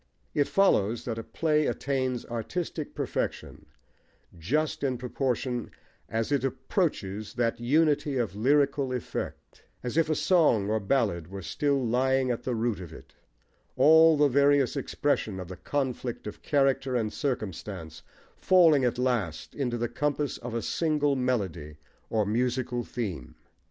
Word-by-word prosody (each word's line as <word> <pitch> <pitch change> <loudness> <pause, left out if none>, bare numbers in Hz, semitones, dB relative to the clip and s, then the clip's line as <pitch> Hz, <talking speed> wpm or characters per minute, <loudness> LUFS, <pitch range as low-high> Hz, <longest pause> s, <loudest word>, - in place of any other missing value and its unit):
It 145 -1 +2
follows 120 - +2
that 115 -2 -3
a - - -5
play 150 +6 +1
attains 130 -3 -1
artistic 150 +7 -4
perfection - - -4 0.7
just 140 - -1
in 130 -3 0
proportion 125 -1 -2 0.4
as 115 +4 -2
it 140 -3 +1
approaches 130 - -2
that 115 -1 0
unity 145 +2 +2
of 115 -5 -1
lyrical 140 +3 +2
effect, 125 - -6 0.2
as 125 +4 -3
if 165 -1 +3
a 155 - +2
song 145 - +3
or 110 - +1
ballad 100 - 0
were 95 +1 -8
still 140 - 0
lying 130 +2 +2
at 120 - -3
the 125 - -2
root 115 -2 -1
of 90 -4 -9
it, - - -13 0.6
all 160 +1 +6
the 145 0 +5
various 140 0 +3
expression 135 -7 -1
of 90 -1 -7
the 95 - -6
conflict 130 -3 -3
of 105 - -7
character 135 -2 +1
and 110 -3 -1
circumstance 100 - -4 0.4
falling 165 -7 +5
at 120 -1 +1
last 120 -11 -1
into 125 -4 -2
the 120 0 -1
compass 145 +3 -2
of 120 -1 -6
a 115 - -2
single 150 -3 +1
melody, 95 - -2 0.3
or 110 -2 +1
musical 120 +2 -1
theme. 95 - -5
125 Hz, 145 wpm, -28 LUFS, 110-145 Hz, 0.7 s, all